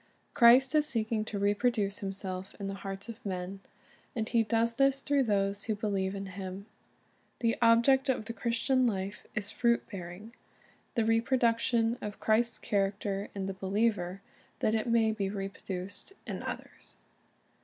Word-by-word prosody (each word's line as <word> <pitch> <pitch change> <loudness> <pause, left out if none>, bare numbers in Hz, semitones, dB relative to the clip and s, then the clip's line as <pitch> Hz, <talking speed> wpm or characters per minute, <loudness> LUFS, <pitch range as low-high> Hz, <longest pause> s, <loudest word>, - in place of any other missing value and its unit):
Christ 250 +4 +7
is 300 -1 +4
seeking 220 -3 0
to 215 - -4
reproduce 205 0 +1
Himself 190 -1 -5
in 200 - -3
the 195 - -3
hearts 195 +1 -6
of 230 -1 -9
men; 185 0 -4 0.6
and 220 -2 -1
He 230 0 +3
does 230 +1 +1
this 275 +2 +3
through 280 -1 +2
those 200 -1 0
who 220 - 0
believe 200 -2 -1
in 195 0 -4
Him. 190 +1 -7 0.7
The 230 -1 +1
object 240 +4 +5
of 245 -5 +1
the 230 - -5
Christian 240 +4 +1
life 200 -1 -3
is 205 -1 -3
fruit 235 -1 +1
bearing, 195 +4 -8 0.3
— - - -33
the 230 -3 +2
reproduction 230 0 +2
of 210 -1 -6
Christ's 230 +2 +2
character 200 0 -1
in 195 -1 -2
the 195 - -3
believer, 195 -1 0 0.4
that 215 - +1
it 220 +1 0
may 230 -1 +3
be 200 -3 -2
reproduced 195 - -6
in - - -4
others. - - -7
215 Hz, 155 wpm, -31 LUFS, 195-235 Hz, 0.7 s, Christ